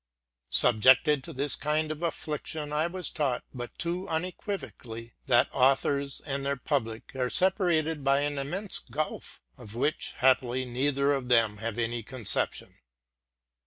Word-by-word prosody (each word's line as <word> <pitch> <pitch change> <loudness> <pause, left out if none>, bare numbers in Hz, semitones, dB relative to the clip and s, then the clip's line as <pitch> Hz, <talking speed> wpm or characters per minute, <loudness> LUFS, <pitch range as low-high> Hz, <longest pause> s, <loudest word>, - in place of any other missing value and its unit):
Subjected 130 - +4
to 165 - -8
this 140 0 0
kind 155 +1 -1
of 155 +1 -6
infliction, 150 -2 -4
I 155 +2 +1
was 180 0 -5
taught 140 -6 -1
but 120 -2 -8
too 175 +2 -3
unequivocally, 160 - -5
that 120 -2 +4
authors 140 +1 +1
and 140 -1 -4
their 140 0 -1
public 120 -4 -3
are 125 -1 -1
separated 165 - +2
by 140 +1 +3
an 145 -1 -1
immense 180 +9 -2
gulf, 150 +5 -6 0.2
of 105 +1 -11
which, 145 +6 -1
happily, 130 -1 +2
neither 140 +3 +1
of 135 -3 -3
them 115 -4 +3
has 115 +1 -4
any 120 0 -2
conception. 115 -1 +2
140 Hz, 140 wpm, -28 LUFS, 125-155 Hz, 0.2 s, Subjected